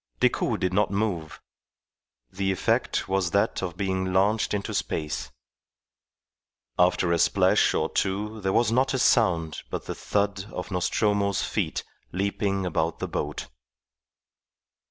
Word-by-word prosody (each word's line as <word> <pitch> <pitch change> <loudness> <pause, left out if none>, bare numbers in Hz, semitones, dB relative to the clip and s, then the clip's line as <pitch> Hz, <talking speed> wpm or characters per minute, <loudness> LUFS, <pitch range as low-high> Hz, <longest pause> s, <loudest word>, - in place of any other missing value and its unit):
Decoud - - +1
did 90 0 0
not 105 +2 +2
move; 100 -7 -2 0.9
the 95 0 -1
effect 95 - 0
was 95 -2 +1
that 100 +3 +1
of 90 -2 -4
being 95 -1 -1
launched 100 +4 +2
into 100 -1 -2
space. 75 -5 -3 1.5
After 90 -1 +3
a 85 - +2
splash - - +3
or - - +1
two 105 +3 -2
there 95 - 0
was 115 +2 +3
not 130 +3 +2
a - - +1
sound 90 -11 +2
but - - -4
the - - -4
thud 100 -1 -1
of 90 +2 -6
Nostromo's 100 +2 +1
feet - - -2 0.3
leaping 100 0 -1
about 80 -2 -1
the - - -3
boat. 75 +1 -3
95 Hz, 135 wpm, -26 LUFS, 90-105 Hz, 1.5 s, After